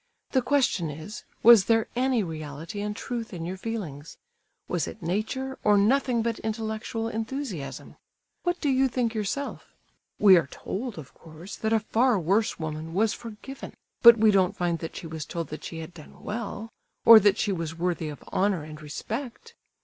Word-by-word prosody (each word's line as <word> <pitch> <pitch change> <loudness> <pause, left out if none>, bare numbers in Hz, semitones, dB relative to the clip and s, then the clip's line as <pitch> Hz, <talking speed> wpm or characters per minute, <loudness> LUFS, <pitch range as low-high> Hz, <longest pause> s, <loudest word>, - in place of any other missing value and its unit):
The 260 - +3
question 250 - +1
is, 160 +10 -8 0.2
was 230 -4 +8
there 225 -1 +2
any 250 -2 +2
reality 160 +4 -6
and 210 0 -3
truth 235 -2 -5
in 165 -1 -5
your 180 +2 -4
feelings? 185 -9 -6 0.5
Was - - -1
it 215 - -9
nature, 220 +9 -2
or 210 -1 +5
nothing 240 +2 +2
but 230 -1 -2
intellectual 220 +1 -3
enthusiasm? 225 - -5 0.4
What 350 0 -1
do 290 - 0
you 265 0 +3
think 240 -2 -1
yourself? 220 +6 -4 0.4
We 195 -3 +7
are 165 - +1
told, 230 +1 -5
of 135 -7 -10
course, 165 +4 -11
that 220 - -1
a 225 - +4
far 230 +2 +2
worse 195 +6 +1
woman 160 0 -5
was 215 +2 +2
forgiven, 235 +4 -9 0.3
but 235 -1 +10
we 215 0 +5
don't 190 -2 +2
find 175 -2 0
that 165 - -6
she - - -7
was 160 -1 -5
told 165 0 -5
that 155 - -7
she 165 - -6
had 160 +2 -9
done 155 -3 -14
well, 220 0 -5 0.4
or 230 -1 +11
that 205 0 +3
she 205 - 0
was 165 -3 -4
worthy 170 -2 -1
of 145 - -9
honour 190 -4 +1
and 155 0 -10
respect! 225 - -6
210 Hz, 180 wpm, -26 LUFS, 165-230 Hz, 0.5 s, or